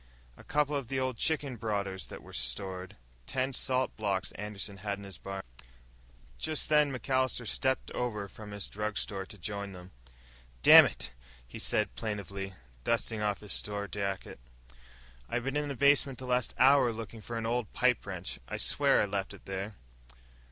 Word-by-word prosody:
A - - -14
couple 150 0 +1
of 135 -4 -3
old 130 -2 0
chicken 145 -4 0
brooders 100 -4 -2
that - - -9
was - - -10
stored. 90 +10 -2 0.3
Ten 130 +1 0
salt 130 0 +1
blocks 100 -4 0
Anderson 100 -1 -5
had 100 +1 -3
in 100 - -10
his 95 -4 -9
barn." 95 0 -5 1.0
Just 155 -1 +1
then 150 -2 +5
MacAllister 130 -1 +1
stepped 130 +4 0
over 105 -5 -2
from 105 +2 -10
his 100 -1 -4
drugstore 105 -2 -3
to 105 - -10
join 100 +2 -4
them. 90 0 -11 0.7
"Dammit," - - +8 0.4
he - - -8
said 105 - +1
plaintively, 100 -3 -4 0.3
dusting 115 - 0
off 105 -2 0
his 105 -2 -4
store 105 0 -2
jacket, 100 -7 -3 0.9
"I - - 0
been 135 +3 -2
in 150 0 +1
the 140 - -3
basement 140 -1 +4
the 130 - -7
last 125 0 +1
hour 130 -1 +6
looking 115 0 -7
for 115 +2 -5
an 115 - -2
old 120 -1 0
pipe - - +3
wrench. - - -5
I - - -3
swear - - +4
I - - +2
left 100 -1 -2
it - - -17
there!" 95 +2 -4
105 Hz, 165 wpm, -31 LUFS, 100-130 Hz, 1.0 s, Dammit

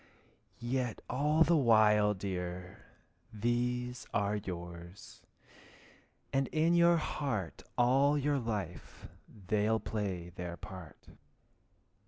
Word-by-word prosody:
yet 120 -1 -2
all 150 +4 +3
the 170 +2 +3
while, 105 -6 +5
dear, 90 -1 -5 0.5
These 125 +2 -1
are 100 +1 +1
yours, 85 -2 -8 1.1
and 135 -1 +2
in 160 +2 +2
your 170 0 +5
heart 135 - -3 0.2
All 135 +4 +4
your 145 0 +1
life 105 -8 -5 0.4
they'll 110 +3 +2
play 95 -7 -3
their 90 -1 -6
part. 90 -5 -10
110 Hz, 95 wpm, -33 LUFS, 95-135 Hz, 1.1 s, while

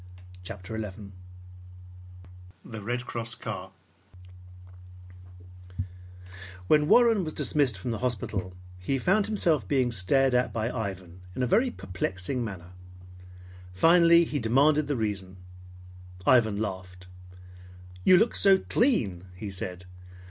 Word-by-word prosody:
CHAPTER 95 +4 -7
XI 100 -1 -8 1.5
THE 110 -2 -8
RED 120 +3 -3
CROSS 115 -1 -5
CAR - - -7 2.9
When 150 +6 +3
Warren 230 -1 +5
was 155 -2 -5
dismissed 140 -8 +1
from 105 +6 -4
the 110 - -3
hospital, 105 -7 -3 0.2
he 115 +10 -1
found 190 +9 +1
himself 165 - +1
being 125 +2 +1
stared 125 +6 +2
at 125 0 +1
by 115 +1 -2
Ivan 95 -6 -6
in 130 - -1
a - - +3
very 230 - +2
perplexing 95 - -4
manner. 90 -5 -8 1.0
Finally 170 - +6
he 150 - -3
demanded 140 +6 +3
the 145 - -1
reason. 100 -5 -3 0.9
Ivan 110 -5 +4
laughed. 90 -3 -6 1.0
"You 185 - +7
look 220 +4 +2
so 195 -1 +5
clean," 120 - 0
he 100 +2 -7
said. 90 -1 -6
115 Hz, 115 wpm, -27 LUFS, 95-150 Hz, 2.9 s, You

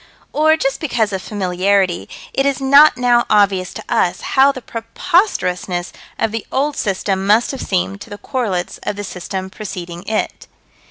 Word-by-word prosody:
Or, 315 +2 +4
just 270 -3 -1
because 230 - 0
of 190 - -2
familiarity, 190 -2 0 0.2
it 270 - +1
is 280 0 0
not 280 +1 +6
now 240 -1 +3
obvious 195 -3 +3
to - - -6
us - - +1
how 270 +1 +6
the 260 - -7
preposterousnesses 225 - -1 0.3
of 225 - 0
the 225 -1 -3
old 285 +2 0
system 195 -3 -1
must 215 +3 +4
have 270 - -6
seemed 195 +1 -1
to - - -10
the 205 - -7
correlates 205 -9 -3
of - - -3
the 205 - -5
system 190 0 -5
preceding 175 -5 -7
it. 220 - -2
210 Hz, 165 wpm, -18 LUFS, 190-265 Hz, 0.3 s, not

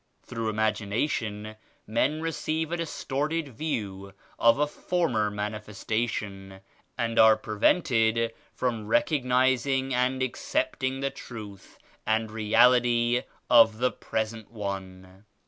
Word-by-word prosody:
Through 115 -1 -3
imagination 110 0 -1 0.3
men 135 +8 0
receive 160 0 -2
a 175 - -1
distorted 155 -1 -2
view 100 -8 -4 0.3
of 115 +1 +5
a 150 - +3
former 150 -9 0
Manifestation 105 -1 -4 0.4
and 115 -1 0
are 110 -1 +7
prevented 115 0 +2 0.2
from 115 -2 -2
recognizing 130 +1 +2
and 130 +1 +1
accepting 135 - -2
the 140 0 -1
Truth 105 -5 -10 0.3
and 110 0 0
Reality 120 +2 +3 0.3
of 115 -2 +6
the 125 +2 +1
present 110 0 -4
one. 95 -2 -7
115 Hz, 100 wpm, -27 LUFS, 110-130 Hz, 0.4 s, are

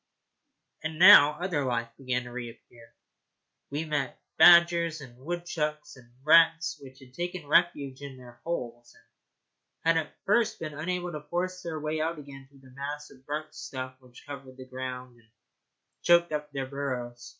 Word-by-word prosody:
And 160 0 -4
now 175 -5 +9
other 175 -5 -1
life 115 -2 -1
began 125 -1 -2
to 120 - -10
reappear. 120 -1 -10 0.7
We 150 +3 -3
met 145 -4 -2 0.2
badgers 170 -1 +6
and 130 -4 -12
woodchucks 155 -1 -4
and 120 -2 -18
rats 165 +1 +4
which 130 -1 -13
had 130 -1 -16
taken 175 +1 -5
refuge 145 -4 +1
in 140 -2 -8
their 120 -1 -15
holes, 120 -8 -5 0.9
and 165 0 +4
had 160 -2 -1
at - - -28
first 215 +3 +2
been 155 -2 -5
unable 175 +3 -3
to 150 -2 -6
force 185 +2 -2
their 165 -3 -5
way 155 +1 -2
out 165 +1 -2
again 135 -2 -11
through 135 -1 -21
the - - -17
mass 145 +2 -6
of 130 0 -19
burnt 155 +1 -4
stuff 130 -1 -7
which 125 -2 -17
covered 135 -2 -10
the 130 - -10
ground 130 -1 -7
and 115 -1 -27 0.7
choked 170 -1 +4
up 150 -1 -4
their 135 -1 -3
burrows. 130 -3 -5
145 Hz, 165 wpm, -28 LUFS, 130-165 Hz, 0.9 s, now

